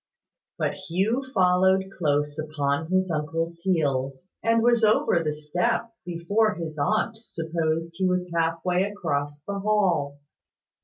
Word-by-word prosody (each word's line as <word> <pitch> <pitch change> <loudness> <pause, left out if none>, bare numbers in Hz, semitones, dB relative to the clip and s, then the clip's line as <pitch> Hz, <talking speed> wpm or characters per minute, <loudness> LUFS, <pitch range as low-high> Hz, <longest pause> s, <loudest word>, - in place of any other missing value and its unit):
But - - 0
Hugh 190 +8 -1
followed 190 0 +3
close 150 -2 0
upon 150 0 -1
his 185 -1 +1
uncle's 165 +2 -2
heels, 145 -3 -1
and 230 0 +2
was 235 -1 +4
over 210 -5 +4
the 155 - 0
step 230 +10 -1
before 200 +6 +1
his 160 -3 -6
aunt 215 +9 +1
supposed 165 -5 -2
he 185 +2 0
was 180 -1 -1
half 165 0 0
way 180 0 +2
across 145 -7 -3
the 200 0 -3
hall. 185 -9 +1
170 Hz, 135 wpm, -25 LUFS, 155-195 Hz, -, was